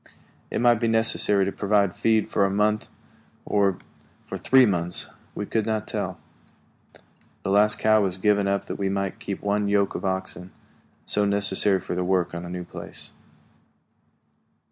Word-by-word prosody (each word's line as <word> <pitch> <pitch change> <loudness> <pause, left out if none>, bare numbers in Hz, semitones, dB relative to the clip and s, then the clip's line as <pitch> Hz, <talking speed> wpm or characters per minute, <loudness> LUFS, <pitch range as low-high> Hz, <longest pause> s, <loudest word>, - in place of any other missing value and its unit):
It - - -2
might 120 -2 +4
be 115 - 0
necessary 110 -3 +2
to 100 - -2
provide 100 -2 +1
feed 110 -1 +1
for 100 - +2
a 100 - +2
month, 105 +2 0 0.6
or 100 -3 +1 0.5
for - - -7
three 130 -1 +4
months; 90 -4 +1 0.3
we 105 - -4
could 110 +1 -1
not 110 -1 -2
tell. - - -4 1.2
The 95 - -2
last 105 +1 +4
cow 110 0 +3
was 95 -2 0
given 100 0 +2
up 100 0 -1
that - - -6
we 95 -1 0
might 100 0 -3
keep 100 - -6
one 105 0 0
yoke 100 -1 +1
of - - -5
oxen, 95 -1 -4 0.6
so 105 - +1
necessary 100 -1 +2
for - - -6
the 90 +1 -1
work 90 -1 0
on 85 0 -6
a - - -8
new 90 0 -5
place. - - -8
100 Hz, 165 wpm, -24 LUFS, 95-105 Hz, 1.2 s, might